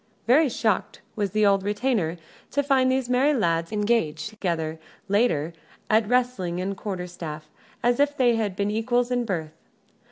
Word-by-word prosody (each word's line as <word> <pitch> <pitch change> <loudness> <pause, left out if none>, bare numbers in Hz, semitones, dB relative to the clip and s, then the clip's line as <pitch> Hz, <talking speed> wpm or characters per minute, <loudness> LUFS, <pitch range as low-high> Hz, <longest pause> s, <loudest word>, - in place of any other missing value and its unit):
Very 280 +5 +5
shocked 220 -4 -1 0.2
was 205 -2 -1
the 215 +2 +2
old 200 -1 +4
retainer 205 -4 0 0.3
to 285 - 0
find 265 -2 +3
these 260 -1 0
merry 265 +4 +3
lads 165 -6 0
engaged 210 -7 0
together, 165 -7 -3 0.3
later, 195 -7 +1 0.4
at 215 0 +4
wrestling 245 -9 0
and 190 +2 -2
the - - -5
quarter 190 -2 -4
staff, 155 -3 -8 0.3
as 240 +1 +2
if 290 0 +2
they 245 -3 +4
had 210 -4 -1
been 200 +1 -1
equals 240 +3 0
in 245 -1 0
birth. 160 -7 -3
210 Hz, 165 wpm, -25 LUFS, 180-245 Hz, 0.4 s, Very